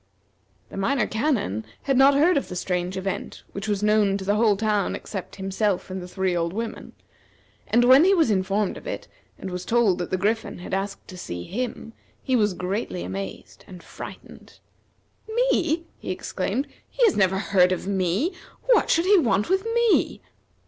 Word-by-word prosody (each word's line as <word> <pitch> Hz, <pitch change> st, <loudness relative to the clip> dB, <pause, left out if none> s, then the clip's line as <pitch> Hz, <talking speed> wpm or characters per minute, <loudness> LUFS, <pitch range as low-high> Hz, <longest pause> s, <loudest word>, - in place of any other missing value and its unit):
The -, -, -9 dB
Minor 235 Hz, +4 st, +1 dB
Canon 220 Hz, -, -1 dB, 0.2 s
had 270 Hz, -, +1 dB
not 270 Hz, +2 st, +6 dB
heard 330 Hz, +6 st, +4 dB
of 280 Hz, -, -1 dB
the 180 Hz, -, -6 dB
strange 180 Hz, 0 st, -2 dB
event, 190 Hz, 0 st, -4 dB
which 200 Hz, +2 st, -6 dB
was 205 Hz, -1 st, -1 dB
known 210 Hz, -2 st, +3 dB
to 190 Hz, -, -7 dB
the 205 Hz, -, +2 dB
whole 210 Hz, -1 st, +3 dB
town 210 Hz, -2 st, 0 dB
except 195 Hz, -4 st, -7 dB
himself 195 Hz, 0 st, -1 dB
and 185 Hz, 0 st, -4 dB
the 180 Hz, -, -8 dB
three 190 Hz, -1 st, -1 dB
old 170 Hz, 0 st, -1 dB
women, 225 Hz, +2 st, -5 dB, 0.7 s
and 240 Hz, +2 st, +3 dB
when 260 Hz, +4 st, +8 dB
he 390 Hz, +2 st, +5 dB
was 320 Hz, -10 st, +3 dB
informed 195 Hz, +1 st, 0 dB
of -, -, -11 dB
it, -, -, -5 dB, 0.3 s
and 190 Hz, -, -6 dB
was 180 Hz, 0 st, -4 dB
told 225 Hz, -6 st, +2 dB
that 175 Hz, -, -3 dB
the 185 Hz, -, 0 dB
Griffin 220 Hz, +4 st, -1 dB
had 175 Hz, -, -8 dB
asked 195 Hz, +1 st, -3 dB
to 185 Hz, -, -9 dB
see 85 Hz, -, -6 dB
him, 230 Hz, -, -5 dB, 0.3 s
he 260 Hz, -, +1 dB
was 210 Hz, -5 st, +2 dB
greatly 180 Hz, -, -3 dB
amazed, 95 Hz, +2 st, -7 dB
and 180 Hz, -2 st, -11 dB
frightened. -, -, -11 dB, 0.7 s
"Me!" 440 Hz, -9 st, +1 dB
he -, -, -7 dB
exclaimed. 195 Hz, +7 st, -2 dB, 0.2 s
"He -, -, +2 dB
has 420 Hz, -, +3 dB
never 190 Hz, -1 st, +3 dB
heard 185 Hz, -2 st, +3 dB
of 185 Hz, -, -2 dB
me! 195 Hz, -, 0 dB, 0.3 s
What -, -, +3 dB
should 335 Hz, +1 st, +3 dB
he 400 Hz, 0 st, +6 dB
want 210 Hz, -, +1 dB
with 385 Hz, +2 st, +2 dB
me?" 470 Hz, -2 st, +2 dB
205 Hz, 185 wpm, -24 LUFS, 185-255 Hz, 0.7 s, when